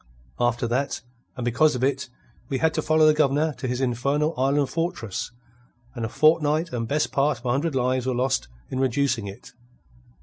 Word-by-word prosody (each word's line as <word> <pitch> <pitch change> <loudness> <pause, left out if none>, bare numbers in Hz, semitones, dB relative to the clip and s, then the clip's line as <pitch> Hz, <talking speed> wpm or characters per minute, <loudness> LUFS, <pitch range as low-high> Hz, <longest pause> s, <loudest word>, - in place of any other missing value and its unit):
After 120 0 +1
that, 130 +4 -1 0.4
and 125 - -3
because 125 +5 +3
of 125 - -3
it, 135 -1 0 0.4
we 135 - 0
had 160 +3 +2
to 155 - 0
follow 155 0 +3
the 155 - +6
Governor 150 +1 +2
to 130 - -3
his 125 0 -2
infernal 140 +5 0
island 135 +1 +1
fortress, 165 - -3 0.6
and 120 -3 -5
a 110 - -2
fortnight 155 +2 +2
and 115 -2 -2
best 150 +4 0
part 140 0 +1
of 120 - -17
a 120 - +1
hundred 140 +3 0
lives 130 0 0
were 130 - 0
lost 130 - 0 0.2
in 130 - -2
reducing 130 -4 +1
it. 100 +6 -10
135 Hz, 190 wpm, -24 LUFS, 125-150 Hz, 0.6 s, the